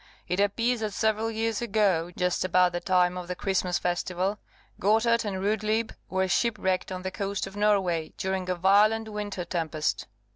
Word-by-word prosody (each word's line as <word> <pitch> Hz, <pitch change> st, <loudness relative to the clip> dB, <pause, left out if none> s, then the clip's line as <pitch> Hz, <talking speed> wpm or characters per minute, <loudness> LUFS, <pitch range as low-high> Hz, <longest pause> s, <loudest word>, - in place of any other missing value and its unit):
It 180 Hz, +2 st, -1 dB
appears 230 Hz, +4 st, +1 dB
that 215 Hz, -2 st, -3 dB
several 220 Hz, +1 st, +1 dB
years 225 Hz, 0 st, -1 dB
ago, 200 Hz, -7 st, +1 dB
just 180 Hz, -1 st, 0 dB
about 180 Hz, 0 st, +3 dB
the 175 Hz, -, -2 dB
time 180 Hz, -1 st, +2 dB
of 180 Hz, -, -8 dB
the 180 Hz, -, -3 dB
Christmas 185 Hz, -1 st, 0 dB
festival, 180 Hz, +3 st, -1 dB, 0.4 s
Gotthard 225 Hz, +3 st, +3 dB
and 195 Hz, -2 st, -3 dB
Rudlieb 215 Hz, +2 st, 0 dB, 0.2 s
were 190 Hz, 0 st, 0 dB
shipwrecked 190 Hz, -3 st, 0 dB
on 185 Hz, 0 st, -5 dB
the 190 Hz, -, -3 dB
coast 200 Hz, +1 st, -3 dB
of 195 Hz, -, -10 dB
Norway, 195 Hz, -6 st, +1 dB
during 190 Hz, -1 st, -2 dB
a 180 Hz, -, +1 dB
violent 210 Hz, +5 st, +3 dB
winter 205 Hz, -4 st, -4 dB
tempest. 160 Hz, -3 st, -2 dB
195 Hz, 170 wpm, -27 LUFS, 180-215 Hz, 0.4 s, about